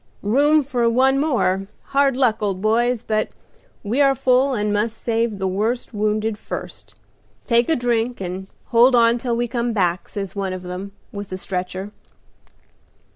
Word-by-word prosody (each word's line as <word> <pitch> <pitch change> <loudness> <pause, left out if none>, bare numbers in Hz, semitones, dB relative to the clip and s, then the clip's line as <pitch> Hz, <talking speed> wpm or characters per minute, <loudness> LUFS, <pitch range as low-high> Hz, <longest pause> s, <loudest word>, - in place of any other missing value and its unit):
"'Room 290 +8 +4
for 245 -3 +1
one 265 +3 +3
more. 195 -10 +1 0.2
Hard 275 -2 +2
luck, 235 -5 +2
old 195 -3 -1
boys, 235 +3 +1
but 215 -2 0 0.5
we 230 +7 0
are 275 -1 +4
full 260 +2 +2
and 210 -1 0
must 215 +2 -1
save 230 -2 -1
the 190 -1 -1
worst 220 +7 -1
wounded 215 0 -1
first. - - -8 0.5
Take 235 +1 +2
a 320 - +4
drink, 240 0 0
and 185 +1 -5 0.2
hold 245 +2 +5
on 235 0 +4
till 240 -1 -1
we 240 0 0
come 235 -1 -1
back,' 180 -3 0
says 195 -2 -5
one 195 -2 -2
of 185 0 -6
them 180 +2 -6 0.2
with 200 -1 -6
the 185 - -5
stretcher. 185 +1 -4
225 Hz, 165 wpm, -21 LUFS, 200-245 Hz, 0.5 s, hold